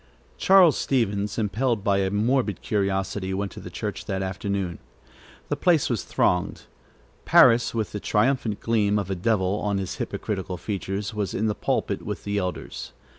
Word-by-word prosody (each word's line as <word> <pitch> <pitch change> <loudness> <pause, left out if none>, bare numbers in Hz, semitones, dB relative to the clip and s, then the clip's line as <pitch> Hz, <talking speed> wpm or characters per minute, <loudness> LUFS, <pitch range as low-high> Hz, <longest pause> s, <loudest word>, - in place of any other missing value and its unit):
Charles 185 -5 +6
Stevens, 105 -6 0
impelled 110 +1 0
by 100 -2 +2
a 95 -1 +1
morbid 110 +1 0
curiosity, 95 -1 -1
went 100 -1 -2
to - - -9
the - - -8
church - - -5
that 95 0 -2
afternoon. 95 -1 -3 0.7
The - - +1
place 165 -7 +2
was 110 -6 0
thronged. 90 -1 0 0.6
Parris, 120 -2 +5
with 110 -3 -1
the 105 - -4
triumphant 110 0 0
gleam 105 -3 +2
of 100 -2 -2
a - - 0
devil 95 0 +1
on 100 -1 -1
his 95 -2 -4
hypocritical 95 -3 -4
features, 100 +1 -4
was 105 -3 -2
in 110 - 0
the 105 - +1
pulpit - - -1
with - - -5
the 100 0 -1
elders. 90 -9 -5
100 Hz, 165 wpm, -25 LUFS, 95-110 Hz, 0.7 s, Charles